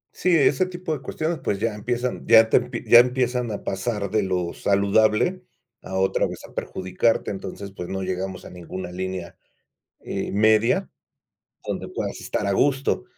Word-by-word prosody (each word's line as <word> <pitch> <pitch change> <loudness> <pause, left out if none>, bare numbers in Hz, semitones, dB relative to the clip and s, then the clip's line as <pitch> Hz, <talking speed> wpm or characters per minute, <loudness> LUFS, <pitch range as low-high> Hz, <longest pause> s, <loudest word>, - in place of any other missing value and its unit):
Sí, 180 -2 +2
ese 145 +4 +3
tipo 175 -2 -4
de 135 - -9
cuestiones, 160 +5 -3
pues, 100 - -1
ya 115 0 0
empiezan 120 +4 -3
ya 115 -1 +8
te - - +2 0.2
ya 120 - +9
empiezan 125 -1 +1
a 105 - -5
pasar 100 0 -2
de 110 - +2
lo 90 -3 -1
saludable 105 - +2 0.4
a 95 - -7
otra 95 0 +2
vez - - -7 0.2
perjudicarte, 95 +6 -1
entonces, 100 0 -7
pues, 90 -2 -7
no 95 0 -3
llegamos 95 0 -4
a - - -10
ninguna 90 +1 -7
línea, 95 -1 -5 0.7
eh, - - -4
media, 110 +3 +3 0.8
donde - - -4
puedas - - -4
estar 105 - -2
a 100 - +1
gusto 135 - +1
105 Hz, 160 wpm, -24 LUFS, 95-125 Hz, 0.8 s, ya